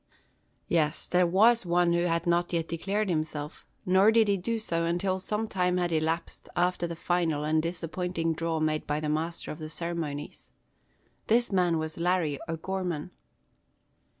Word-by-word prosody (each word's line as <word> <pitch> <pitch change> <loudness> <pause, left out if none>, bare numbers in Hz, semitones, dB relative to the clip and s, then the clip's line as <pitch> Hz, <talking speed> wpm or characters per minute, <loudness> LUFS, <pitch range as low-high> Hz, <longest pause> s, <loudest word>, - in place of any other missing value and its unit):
Yes, 155 -2 +1
there 180 0 +3
was 220 +6 +5
one 175 -1 +2
who 170 0 +2
had 170 0 0
not 175 0 +1
yet 165 -1 0
declared 195 +6 -1
himself; 155 -3 -3 0.2
nor 190 +4 +5
did 225 -1 +4
he 200 - +4
do 225 +5 -2
so 170 -6 -1
until 175 +3 0
some 210 +3 -2
time 180 -3 +1
had 175 -1 0
elapsed 160 +1 -2
after 175 0 +1
the 170 - -5
final 165 -3 0
and 155 +1 +2
disappointing 165 0 -2
draw 165 0 -2
made 155 0 0
by 150 +1 0
the 155 -1 -2
master 160 +2 -2
of 155 - -8
the 155 -1 -6
ceremonies. 160 -4 -5 0.7
This 235 +1 +3
man 180 -3 +2
was 160 +1 -4
Larry 170 -5 +1
O'Gorman. 180 0 -3
170 Hz, 160 wpm, -28 LUFS, 160-180 Hz, 0.7 s, was